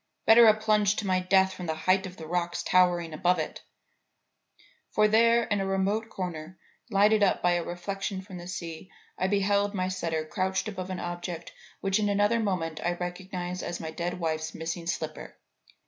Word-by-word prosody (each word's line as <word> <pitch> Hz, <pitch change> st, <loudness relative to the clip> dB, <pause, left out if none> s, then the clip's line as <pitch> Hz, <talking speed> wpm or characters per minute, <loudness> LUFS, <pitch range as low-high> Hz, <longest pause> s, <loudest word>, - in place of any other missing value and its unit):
Better 225 Hz, +1 st, +8 dB
a 215 Hz, -, +7 dB
plunge 210 Hz, -1 st, +3 dB
to 215 Hz, -, -3 dB
my 185 Hz, -1 st, +2 dB
death 190 Hz, +1 st, +3 dB
from 180 Hz, -2 st, -7 dB
the 160 Hz, -, -1 dB
height 185 Hz, +4 st, +1 dB
of 185 Hz, -, -11 dB
the 160 Hz, -, -8 dB
rocks 175 Hz, +1 st, -2 dB
towering 175 Hz, -3 st, +3 dB
above 180 Hz, +3 st, +2 dB
it. 155 Hz, -, -4 dB, 1.3 s
For 215 Hz, 0 st, +3 dB
there 230 Hz, +2 st, +4 dB
in 205 Hz, -3 st, -1 dB
a -, -, -1 dB
remote 200 Hz, +3 st, 0 dB
corner, 175 Hz, -3 st, -6 dB, 0.3 s
lighted 210 Hz, +2 st, +4 dB
up 200 Hz, -, +2 dB
by 175 Hz, -, +4 dB
a 175 Hz, -1 st, +1 dB
reflection 190 Hz, +2 st, -4 dB
from 185 Hz, -2 st, -9 dB
the 175 Hz, -, -9 dB
sea, 170 Hz, 0 st, -6 dB, 0.3 s
I 185 Hz, -, +1 dB
beheld 200 Hz, +1 st, +1 dB
my 185 Hz, -1 st, 0 dB
setter 165 Hz, -4 st, -2 dB
crouched 190 Hz, +3 st, -1 dB
above 190 Hz, -3 st, -5 dB
an 185 Hz, -, -4 dB
object 175 Hz, -1 st, -5 dB, 0.3 s
which 195 Hz, +1 st, +1 dB
in 205 Hz, -1 st, +1 dB
another 205 Hz, +3 st, +2 dB
moment 180 Hz, -7 st, -2 dB
I 175 Hz, -, +1 dB
recognized 180 Hz, 0 st, -5 dB
as 175 Hz, -, -4 dB
my 160 Hz, -1 st, -5 dB
dead 175 Hz, +2 st, -4 dB
wife's 160 Hz, -1 st, -2 dB
missing 165 Hz, +1 st, -4 dB
slipper. 160 Hz, -2 st, -4 dB
185 Hz, 185 wpm, -28 LUFS, 175-200 Hz, 1.3 s, Better